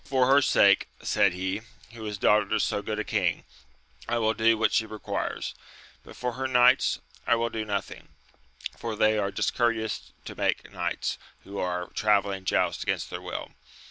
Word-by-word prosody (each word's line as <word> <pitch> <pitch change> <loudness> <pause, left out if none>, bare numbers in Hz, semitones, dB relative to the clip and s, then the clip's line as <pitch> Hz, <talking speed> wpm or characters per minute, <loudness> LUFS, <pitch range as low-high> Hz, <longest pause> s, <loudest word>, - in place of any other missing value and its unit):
For 130 -2 +2
her 135 +2 +5
sake, 100 -7 +4 0.2
said 100 - +3
he, 95 +3 -3 0.3
who 115 -1 -10
is 105 -1 -4
daughter 105 +2 +3
to 110 - 0
so 100 - 0
good 105 0 -4
a 110 - -1
king, 95 -7 0 0.7
I 120 - +1
will 110 -1 +2
do 115 +1 +3
what 110 - +2
she 110 - +2
requires; 110 -1 -4 0.5
but - - -13
for 125 0 -2
her 130 +2 -2
knights 125 0 +4 0.3
I 120 - +5
would 115 0 -1
do 110 -1 -2
nothing, 100 -1 -4 0.7
for 115 -2 -4
they 110 0 +3
are 100 -1 0
discourteous 115 +1 -1
to - - -7
make - - -1
knights - - -2 0.2
who 100 +1 -7
are 90 0 -2
travelling 100 -3 +1
joust - - +1
against - - -2
their - - -5
will. - - -6
110 Hz, 175 wpm, -27 LUFS, 100-115 Hz, 0.7 s, her